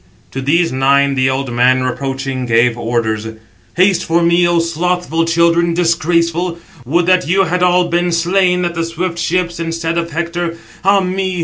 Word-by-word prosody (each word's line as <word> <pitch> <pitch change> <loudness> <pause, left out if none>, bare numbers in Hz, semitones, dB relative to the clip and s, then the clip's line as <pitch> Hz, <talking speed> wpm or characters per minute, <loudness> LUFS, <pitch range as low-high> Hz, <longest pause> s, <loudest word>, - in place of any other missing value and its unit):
To 135 - -5
these 165 +5 +1
nine 140 +1 +2
the 130 -1 +1
old 130 -1 -3
man, 130 +1 +2
reproaching, 135 0 -3
gave 115 +1 +2
orders: 115 -2 -2 0.5
"Haste 185 +1 +2
for 170 +1 +1
me, 170 +1 +3
O 175 0 +1
slothful 170 0 -1
children, 170 0 +2
disgraceful; 170 0 0 0.3
would 170 +5 +1
that 185 -4 +2
you 190 +3 +3
had 180 0 -1
all 180 0 +3
been 175 +1 0
slain 180 +1 +1
at 175 - -2
the 165 -1 -2
swift 170 +1 -4
ships, 175 -1 -1
instead 165 0 -2
of 170 0 -4
Hector. 170 +1 -3 0.3
Ah 195 +1 +3
me! 185 0 -2
170 Hz, 170 wpm, -15 LUFS, 140-175 Hz, 0.5 s, me